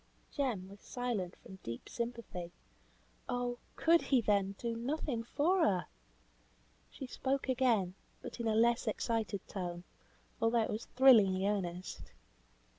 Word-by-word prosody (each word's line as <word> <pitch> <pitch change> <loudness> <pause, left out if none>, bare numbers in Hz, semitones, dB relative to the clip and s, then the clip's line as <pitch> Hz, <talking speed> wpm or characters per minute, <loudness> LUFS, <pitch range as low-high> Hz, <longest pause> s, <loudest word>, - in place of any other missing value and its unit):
Jem 245 -10 -1
was 200 +1 -12
silent 230 -9 -3
from 190 - -12
deep 115 0 -6
sympathy. 230 -7 -5 0.8
Oh! 245 -1 -1 0.2
could 335 +1 +5
he, 265 - +3
then, 200 -3 +1
do 235 -1 -2
nothing 250 0 -2
for 325 +10 +2
her! 185 - +2 1.0
She 270 - -7
spoke 265 +2 -1
again, 240 -8 +2 0.3
but - - -8
in 235 - -1
a 220 - +2
less 235 +2 +3
excited 220 -2 -1
tone, 175 -2 -4 0.6
although 225 0 +3
it - - -2
was 215 +2 -4
thrillingly 210 -8 +6
earnest. 180 - -3
230 Hz, 130 wpm, -34 LUFS, 195-250 Hz, 1.0 s, thrillingly